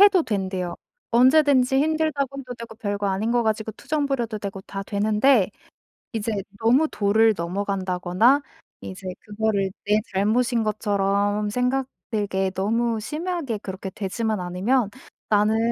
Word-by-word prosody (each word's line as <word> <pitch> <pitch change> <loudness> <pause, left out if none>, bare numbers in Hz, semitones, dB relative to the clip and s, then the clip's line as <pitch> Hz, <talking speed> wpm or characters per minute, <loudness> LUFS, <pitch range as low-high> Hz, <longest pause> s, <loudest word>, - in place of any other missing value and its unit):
해도 400 -3 +7
된대요. 190 - -2 0.3
"언제든지 260 +1 +5
힘들다고 295 -3 0
해도 255 -2 -7
되고 230 -1 -9
별거 205 -2 -2
아닌 205 +4 0
거 240 -1 +3
가지고 220 0 -1
투정 290 +5 -2
부려도 235 -6 -2
되고 200 -1 -5
다 195 +1 -6
되는데 210 +2 +3 0.6
이제 225 0 -2 0.3
너무 250 +8 +4
도를 220 0 +3
넘어간다거나 190 - +1 0.4
이제 185 0 -7
그거를 210 -2 -1 0.2
내 210 +1 +3
잘못인 230 +4 +2
것처럼 205 -1 0
생각되게 225 -6 -1
너무 225 +4 0
심하게 305 - -3
그렇게 190 -1 -6
되지만 215 +3 -2
않으면 195 +6 0 0.4
나는 210 +1 +3
220 Hz, 305 characters per minute, -24 LUFS, 200-250 Hz, 0.6 s, 해도